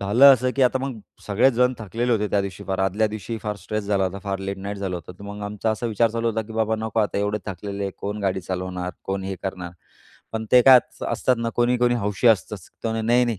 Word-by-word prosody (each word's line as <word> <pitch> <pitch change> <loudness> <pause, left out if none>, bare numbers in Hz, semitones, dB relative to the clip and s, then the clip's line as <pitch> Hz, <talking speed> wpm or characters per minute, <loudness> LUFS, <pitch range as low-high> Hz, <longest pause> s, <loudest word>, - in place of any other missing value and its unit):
झालं 120 +8 +7
असं, 130 +1 -1
की 135 - +3
आता 130 +1 +3
मग 130 -3 -4 0.3
सगळेच 105 +6 +3
जण 125 +2 +3
थकलेले 115 +3 -1
होते 105 -2 +1
त्यादिवशी 100 -3 -2
फार, 95 -1 -2
आदल्या 95 +3 +2
दिवशी 110 +2 -5
फार 105 -1 -3
स्ट्रेस 105 0 -4
झाला 100 -1 +1
होता, 95 +1 -3
फार 100 -1 -2
लेट 95 0 -4
नाईट 100 +1 -5
झालं 95 -2 -3
होतं. 85 +1 -9
तर - - -12
मग 105 0 -7
आमचा 105 +2 -2
असा 110 +2 -2
विचार 115 0 +2
चालू 115 +1 -1
होता, 110 0 -2
की 110 - -9
"बाबा, 110 0 +1
नको 110 0 -1
आता 105 -1 0
एवढे 105 +1 0
थकलेले 100 +2 -5
आहे 100 - -2
कोण 105 +1 -4
गाडी 95 -1 0
चालवणार? 90 0 -4
कोण 95 0 -2
हे 95 0 -3
करणार?" 90 -2 -5 0.6
पण 110 0 -3
ते 125 - +9
काय 130 -1 +9
त, - - -4 0.2
स - - -12
असतात 125 +2 +1
ना 115 0 -1
कोणी-कोणी 120 0 +3
हौशी 105 0 -1
असतचं, 105 -1 +2 0.3
ते - - +1
म्हणे 110 0 -1
"नाही, 120 +1 +4
नाही. 115 -4 -2
105 Hz, 250 wpm, -23 LUFS, 100-115 Hz, 0.6 s, ते